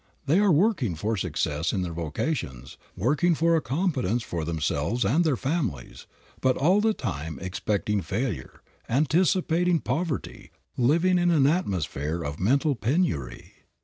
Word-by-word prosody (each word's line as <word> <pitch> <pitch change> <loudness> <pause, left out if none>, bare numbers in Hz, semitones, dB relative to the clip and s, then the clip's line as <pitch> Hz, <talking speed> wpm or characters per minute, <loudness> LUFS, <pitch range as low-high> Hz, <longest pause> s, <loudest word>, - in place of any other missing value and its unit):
They 155 +7 +3
are 205 -2 +4
working 155 - +2
for 105 +8 -1
success 80 -4 -1
in 95 - -1
their 85 -2 -4
vocations, 75 - -4 0.2
working 150 - +2
for 165 +2 +3
a 160 - +2
competence 130 - -1
for 85 -7 -4
themselves 80 +7 -1
and 145 - +3
their 150 -6 +1
families, 135 - -3 0.3
but 130 -1 +2
all 180 +9 +3
the 220 0 +2
time 75 +2 -4
expecting 100 +2 -1
failure, 100 - -4 0.3
anticipating 170 +4 +2
poverty, 150 +2 -3 0.3
living 170 +9 +3
in 175 0 +2
an 155 -6 +4
atmosphere 85 - -1
of 75 0 -5
mental 140 - +2
penury. 110 - -2
130 Hz, 140 wpm, -26 LUFS, -, 0.3 s, are